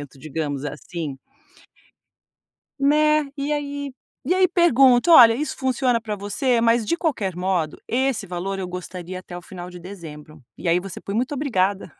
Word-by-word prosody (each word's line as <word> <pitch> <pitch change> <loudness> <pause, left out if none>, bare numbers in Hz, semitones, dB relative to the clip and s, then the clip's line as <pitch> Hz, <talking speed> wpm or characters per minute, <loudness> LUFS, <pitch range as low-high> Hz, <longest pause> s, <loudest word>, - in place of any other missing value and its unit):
pagamento, 140 -1 -11
digamos 150 -1 -4
assim. 150 0 -6 1.6
Né, 300 0 +3
e 285 +2 -1
aí, 285 -1 -4 0.3
e 345 - +2
aí 370 0 +4
pergunta: 275 -5 +4
"Olha, 240 -8 +9
isso 295 +6 -3
funciona 255 -2 +1
para 215 -2 -4
você? 230 +5 0
Mas 230 0 +3
de 335 - 0
qualquer 245 - -1
modo, 180 -4 -1
esse 255 -5 0
valor 190 +2 -4
eu 185 - -4
gostaria 180 0 -7
até 180 -1 -9
o - - -8
final 180 0 -9
de 180 0 -10
dezembro". 160 -5 -11 0.2
E 180 - -5
aí 170 +1 +3
você 190 0 -8
põe 200 - -5
"muito 255 +5 -1
obrigada". 200 - -1
200 Hz, 165 wpm, -22 LUFS, 180-270 Hz, 1.6 s, Olha